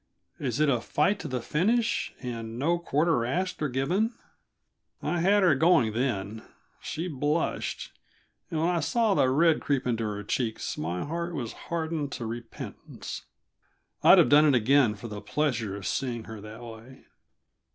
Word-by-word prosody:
Is 130 Hz, -2 st, -2 dB
it 155 Hz, -, +4 dB
a 125 Hz, -5 st, +2 dB
fight 170 Hz, -, +1 dB
to -, -, -5 dB
the 125 Hz, -4 st, -3 dB
finish, 220 Hz, +9 st, +1 dB
and 115 Hz, -2 st, -5 dB
no 170 Hz, +6 st, +1 dB
quarter 160 Hz, -5 st, +1 dB
asked 180 Hz, +11 st, -2 dB
or 150 Hz, -, 0 dB
given?" 180 Hz, -, 0 dB, 0.8 s
I 175 Hz, -, -1 dB
had 200 Hz, +4 st, +4 dB
her 175 Hz, -5 st, +6 dB
going 140 Hz, -7 st, +4 dB
then. 110 Hz, -3 st, -2 dB, 0.4 s
She 165 Hz, +3 st, -4 dB
blushed 150 Hz, +1 st, -2 dB, 0.6 s
and 160 Hz, -, -2 dB
when 165 Hz, -, +2 dB
I 175 Hz, -, +1 dB
saw 225 Hz, -, +2 dB
the 130 Hz, -, +3 dB
red 160 Hz, +4 st, +3 dB
creep 140 Hz, -3 st, 0 dB
into 115 Hz, -2 st, 0 dB
her 105 Hz, -1 st, -4 dB
cheeks 110 Hz, +2 st, -2 dB
my 85 Hz, -, -3 dB
heart 170 Hz, +3 st, -3 dB
was 120 Hz, -6 st, -4 dB, 0.2 s
hardened 160 Hz, -3 st, -2 dB
to 120 Hz, -, -5 dB
repentance. 115 Hz, +1 st, -7 dB, 0.8 s
I'd -, -, +8 dB
have -, -, +6 dB
done 150 Hz, +3 st, +7 dB
it 140 Hz, -, +4 dB
again 120 Hz, -1 st, +4 dB
for 105 Hz, +3 st, -8 dB
the 105 Hz, -2 st, -7 dB
pleasure 115 Hz, -5 st, -1 dB
of 100 Hz, -, -7 dB
seeing 120 Hz, -4 st, -2 dB
her 110 Hz, -1 st, -9 dB
that 110 Hz, +3 st, -10 dB
way. 115 Hz, +3 st, -12 dB
135 Hz, 165 wpm, -28 LUFS, 115-165 Hz, 0.8 s, I'd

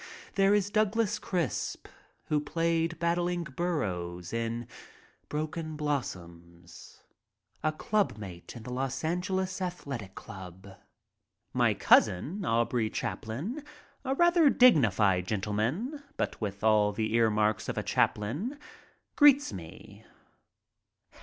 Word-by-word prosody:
There 195 Hz, +1 st, +4 dB
is 205 Hz, -1 st, 0 dB
Donald 215 Hz, 0 st, +1 dB
Crisp, 165 Hz, -, -2 dB, 0.4 s
who 150 Hz, -, +1 dB
played 165 Hz, +2 st, 0 dB
Battling 175 Hz, +1 st, 0 dB
Burrows 95 Hz, -, -3 dB
in 115 Hz, +1 st, -2 dB, 0.6 s
"Broken 155 Hz, +1 st, -3 dB
Blossoms," 85 Hz, -, -6 dB, 0.6 s
a 155 Hz, -, +1 dB
club 200 Hz, -, 0 dB
mate 95 Hz, -3 st, -9 dB
in 115 Hz, -, -9 dB
the 125 Hz, -, -6 dB
Los 130 Hz, +2 st, -2 dB
Angeles 185 Hz, +3 st, -1 dB
Athletic 140 Hz, -, -5 dB
Club. 95 Hz, 0 st, -10 dB, 0.8 s
My -, -, +3 dB
cousin, 155 Hz, -, +3 dB
Aubrey 115 Hz, -3 st, +1 dB
Chaplin, 160 Hz, -, -4 dB, 0.4 s
a 265 Hz, 0 st, -1 dB
rather 345 Hz, -1 st, +5 dB
dignified 105 Hz, -, +4 dB
gentleman, 115 Hz, -, -1 dB, 0.2 s
but -, -, -2 dB
with 100 Hz, -1 st, -4 dB
all 105 Hz, -1 st, +4 dB
the 110 Hz, +1 st, -2 dB
earmarks 110 Hz, -2 st, +2 dB
of -, -, -3 dB
a -, -, -1 dB
Chaplin, 150 Hz, -, 0 dB, 0.6 s
greets 290 Hz, -1 st, +6 dB
me. 85 Hz, -4 st, -10 dB
140 Hz, 105 wpm, -29 LUFS, -, 0.8 s, greets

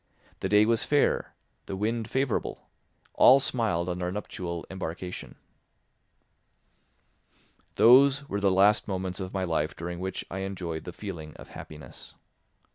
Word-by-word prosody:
The -, -, -2 dB
day 105 Hz, +1 st, +5 dB
was 115 Hz, 0 st, +2 dB
fair, 145 Hz, -1 st, +1 dB, 0.3 s
the 95 Hz, -, -4 dB
wind 110 Hz, +3 st, -2 dB
favourable; 130 Hz, -3 st, -2 dB, 0.5 s
all 135 Hz, +2 st, +7 dB
smiled 110 Hz, -10 st, 0 dB
on 90 Hz, 0 st, -3 dB
our 90 Hz, 0 st, -1 dB
nuptial 90 Hz, -4 st, -5 dB
embarkation. 90 Hz, -1 st, -6 dB, 2.4 s
Those 140 Hz, +4 st, +6 dB
were 100 Hz, -, -2 dB
the 100 Hz, -, +4 dB
last 100 Hz, +3 st, +4 dB
moments 95 Hz, -1 st, -3 dB
of 95 Hz, -1 st, -5 dB
my 95 Hz, -1 st, -2 dB
life 80 Hz, -3 st, -1 dB
during 85 Hz, +1 st, -6 dB
which 95 Hz, +1 st, -4 dB
I 95 Hz, -, -4 dB
enjoyed 90 Hz, -5 st, -5 dB
the 90 Hz, -, -6 dB
feeling 85 Hz, -6 st, -8 dB
of -, -, -12 dB
happiness. 75 Hz, -4 st, -11 dB
95 Hz, 135 wpm, -27 LUFS, 90-110 Hz, 2.4 s, all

